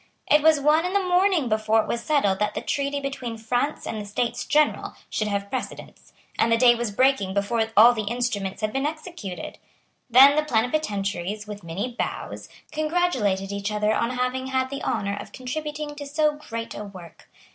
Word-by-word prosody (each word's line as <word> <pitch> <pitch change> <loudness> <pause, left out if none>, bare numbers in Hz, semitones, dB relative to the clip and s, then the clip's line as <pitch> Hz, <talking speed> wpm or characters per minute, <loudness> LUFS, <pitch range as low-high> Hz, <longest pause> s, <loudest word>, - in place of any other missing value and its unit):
It 300 - +6
was 315 -1 +5
one 300 +3 +3
in 360 +1 -2
the 400 -1 +2
morning 360 -5 +3
before 215 0 +2
it - - -9
was 235 - -2
settled 220 -10 +1
that 210 0 -1
the 215 - -2
treaty 280 +2 -1
between 265 -4 -5
France 245 +6 -2
and 215 - -4
the - - -7
States 235 +4 -2
General 300 0 +1 0.2
should 215 - -1
have 200 -1 -3
precedence; 260 - -7 0.3
and 230 - +3
the 230 - +5
day 240 0 +6
was 240 -1 -2
breaking 205 -4 +2
before 220 +3 +1
all 235 +3 +9
the 215 -3 -3
instruments 210 -4 -2
had 215 0 -1
been 270 +2 0
executed. 310 - -7 0.5
Then 270 +4 +8
the 305 - +3
plenipotentiaries, 210 - -1
with 210 -1 -8
many 180 +9 -4
bows, - - -5 0.2
congratulated 300 - 0
each 200 +1 -3
other 210 0 +1
on 235 - 0
having 255 +1 -1
had 260 0 -1
the 275 - -4
honour 200 0 -1
of - - -8
contributing 295 +3 -5
to 285 -1 -6
so 300 +1 +2
great 230 -6 -7
a 210 - -6
work. 185 -5 -12
240 Hz, 190 wpm, -24 LUFS, 210-290 Hz, 0.5 s, all